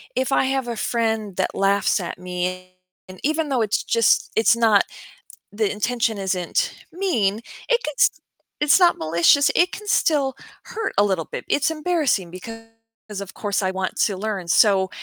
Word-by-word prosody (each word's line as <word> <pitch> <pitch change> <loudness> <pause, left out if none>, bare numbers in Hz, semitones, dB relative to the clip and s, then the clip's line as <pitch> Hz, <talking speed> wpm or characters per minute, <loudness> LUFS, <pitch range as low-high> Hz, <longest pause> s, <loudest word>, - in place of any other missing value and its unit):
if 260 +1 -1
I 265 - +3
have 265 -2 -1
a 235 - -3
friend 220 -4 -1
that 190 - -1
laughs 195 +1 +2
at 175 -1 -6
me, 180 0 -5 0.3
and 185 0 -12
even 310 +1 0
though 255 -3 +1
it's 210 -2 0
just, 230 -2 +2
it's 225 +1 +4
not 225 -3 +4 0.7
the 210 0 -1
intention 225 0 -1
isn't 190 - -1 0.2
mean, 235 - 0 0.3
it 485 -1 +3
gets - - +2 0.5
it's 295 +5 +4
not 350 -2 +4
malicious, 170 - +3
it 355 +1 +3
can 420 - -9
still 285 -9 +1 0.3
hurt 450 -1 -4
a 205 - +5
little 190 -5 0
bit. - - -5
It's 290 - +2
embarrassing 305 - 0
because, 225 +5 -9 0.6
of 195 -1 -9
course, 205 0 -2
I 190 - 0
want 190 0 -3
to 200 -3 -2
learn, 195 -3 -4
so, 190 +1 +4
220 Hz, 170 wpm, -22 LUFS, 190-280 Hz, 0.7 s, a